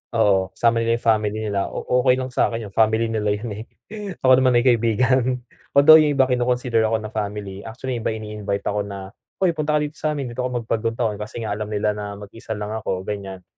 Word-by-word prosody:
oo, 95 -4 +3
sama 115 -1 +2
nila 115 0 +1
yung 115 - -9
family 105 -1 0
nila, 100 -1 -1
o - - -6 0.2
okey 125 0 +4
lang 130 0 -4
sa'kin 115 -2 0
yun, - - -20
family 110 +2 +2
nila 105 -2 0
yun, 110 +1 -6
eh, 105 +2 -6 0.6
ako 130 0 +6
naman 130 -2 +3
ay 120 - +4
kaibigan. 125 +1 +2 0.3
Although 155 +3 +9
yung 150 -2 +2
iba 135 - +5
kino-consider 125 -2 +1
ako 110 -1 -1
na 110 - -6
family, 100 -2 -4
actually 125 +2 -4
yung 110 - -3
iba 110 - -1
ini-invite 105 -2 -4
ako 105 0 -1
na, 100 -1 -6 0.3
"Uy, 180 - +4
punta 155 -1 -1
ka - - +3
dito 150 - -4
sa'min, 145 -5 -2
dito 120 - -9
ka 125 - 0
mag-Bagong-Taon." 115 -2 -2
kasi 110 +2 -6
nga 110 - -3
alam 105 0 -3
nila 105 0 0
na 105 -1 -6
mag-isa 110 +3 -8
lang 105 0 -5
ako, 95 -4 -3
ganiyan. 95 -2 -6
110 Hz, 215 wpm, -22 LUFS, 105-125 Hz, 0.6 s, Although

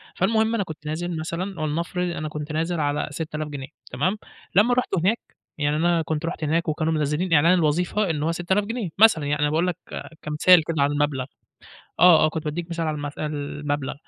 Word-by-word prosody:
فالمهم 220 +4 +2
أنا 210 - 0
كنت 155 -3 -10
نازل 165 +3 -3
مثلًا 170 +3 -4
ولنفرض 170 +4 -2
أنا 155 0 -4
كنت 150 0 -6
نازل 165 +2 -1
على 145 0 0
6000 155 0 -4
جنيه 140 -3 -6 0.2
تمام؟ 175 +12 0 0.4
لمّا 215 +6 +5
رُحت 250 0 +1
هناك، 190 +7 +2 0.4
يعني 145 0 0
أنا 170 +1 +2
كنت 160 0 -3
رُحت 165 -1 -4
هناك 165 +3 0
وكانوا 155 +1 0
منزلين 155 +4 0
إعلان 165 +3 +5
الوظيفة 180 +4 +1
إن 150 -2 -1
هو 165 - +1
6000 175 +4 0
جنيه، 225 -3 -3
مثلًا 205 -8 +5
يعني 145 +1 -1
أنا 150 - +3
باقول 160 +4 +1
لك 180 - -2 0.4
كمثال 160 +3 +5
كده 160 -2 -1
على 145 +1 +1
المبلغ. 145 -3 0 0.8
آه، 175 -3 +7
آه - - +4
كنت 160 0 -5
بادّيك 160 +3 -3
مثال 165 -1 -2
على 155 - -1
المث 145 -1 -5
المبلغ. 145 -1 -3
160 Hz, 195 wpm, -24 LUFS, 150-180 Hz, 0.8 s, آه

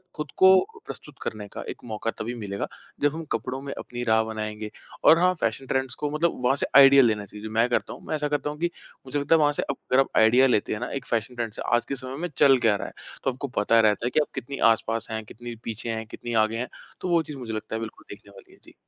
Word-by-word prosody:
खुद 150 -4 -5
को 190 - +5
प्रस्तुत 150 - -9
करने 105 -1 -5
का - - -8
एक - - -8
मौका 110 0 -3
तभी 115 +3 -3
मिलेगा, 100 -3 -4 0.3
जब 145 +1 +3
हम 165 - -5
कपड़ों 130 +1 -2
में 140 0 -5
अपनी 120 0 -6
राह 110 -1 +3
बनाएँगे 110 -1 -5 0.3
और 165 - +7
हाँ 185 +1 +4
फैशन 135 - -1
ट्रेंड्स 130 -1 -1
को 150 - -2
मतलब 165 0 0
वहाँ 135 +2 +4
से - - +1
आइडिया 140 0 +9
लेना 105 -3 +1
चाहिए 105 +2 -11
जो 110 - -4
मैं 115 +2 +3
करता - - -1
हूँ। - - -12
मैं - - -1
ऐसा 150 -1 -1
करता 145 0 -1
हूँ 150 - -6
कि 175 +1 +1 0.4
मुझे 145 +2 -2
लगता 145 +3 +3
है - - +4
वहाँ 145 -1 +4
से - - -1
अप 140 - -2
अगर 130 - +5
आप 135 - +3
आइडिया 120 +4 +6
लेते 105 -5 +1
हैं 105 - -4
ना? 125 - -4
एक 135 -2 -4
फैशन 115 +2 -2
ट्रेंड 115 -2 -3
से - - -7
आज 120 - 0
के 140 - -3
समय 130 0 -7
में 175 - -3
चल 135 -2 +6
क्या 110 -4 +3
रहा - - -4
है? - - -11 0.3
तो 135 - +1
आपको 135 +3 -5
पता 115 +2 +4
रहता 110 +1 +3
है - - +2
कि - - +3
आप 150 - +1
कितनी 135 +1 -5 0.2
आस-पास 115 0 -3
हैं, 110 0 -3
कितनी 120 +2 -9
पीछे 115 +1 -5
हैं, 110 0 -3
कितनी 120 +2 -7
आगे 110 +1 -4
हैं, 125 +2 -3 0.3
तो - - -3
वो 170 -1 +4
चीज़ 150 -2 -8
मुझे 120 -4 -6
लगता 110 +1 -4
है - - -2
बिल्कुल 110 -1 -8
देखने 100 0 -12
वाली 100 - -16
है। - - -21
जी। - - -17
120 Hz, 275 wpm, -25 LUFS, 110-140 Hz, 0.4 s, आइडिया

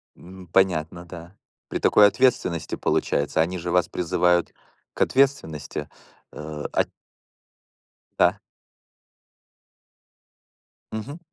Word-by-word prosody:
Ну, 95 +1 -13
понятно, 85 -1 +1
да. 85 +2 -11 0.3
При - - -3
такой 105 -1 +6
ответственности, 115 - +1
получается. 75 +2 0
Они 90 +3 -1
же 85 0 -4
вас 90 -1 +2
призывают 90 0 +1 0.4
к - - -7
ответственности, 130 - 0 0.4
э, 75 0 -7
ат - - +1 1.3
Да. - - +4 2.5
Мгм. 135 +9 -6
90 Hz, 90 wpm, -24 LUFS, 80-95 Hz, 2.5 s, такой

